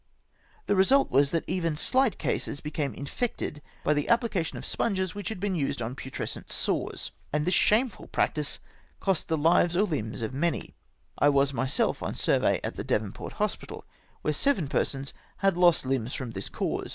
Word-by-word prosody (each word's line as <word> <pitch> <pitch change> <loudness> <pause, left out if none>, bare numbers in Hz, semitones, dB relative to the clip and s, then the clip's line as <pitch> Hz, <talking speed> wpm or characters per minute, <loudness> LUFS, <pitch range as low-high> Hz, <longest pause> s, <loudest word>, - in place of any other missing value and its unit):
The 205 - +2
result 265 +9 +4
was 140 +1 +4
that 165 +1 0
even 165 -4 0
shght 255 - +2
cases 145 - -1
became 150 -2 -3
infected 150 - -3 0.2
by 150 - +3
the 145 -1 -1
application 230 -8 +1
of - - -7
sponges 190 -5 -1
which 205 +2 -4
had 220 - -5
been 200 0 -1
used 140 -5 -1
on 120 +2 -3
putrescent 130 0 -6
sores, - - -2 0.2
and 150 +1 0
this 180 - +2
shameful 220 +4 +2
practice 150 -2 0 0.4
cost 190 -4 0
the 160 - +1
hves 165 +2 +4
or 200 +4 +4
hmbs 115 - -3
of 110 - -3
many. 165 +5 -1 0.5
I 145 - +6
was 140 -1 +3
mj^self 130 0 +1
on - - -2
a - - -9
survey - - +2
at - - -4
the - - -3
Devonport - - -2
hospital, - - -3 0.4
where 150 - +1
seven 190 - +2
persons 135 0 -1 0.2
had 195 -2 +2
lost 175 -5 +5
limbs 130 -2 -1
from 130 -3 -4
this 95 -2 -4
cause - - -2
155 Hz, 180 wpm, -28 LUFS, 140-190 Hz, 0.5 s, I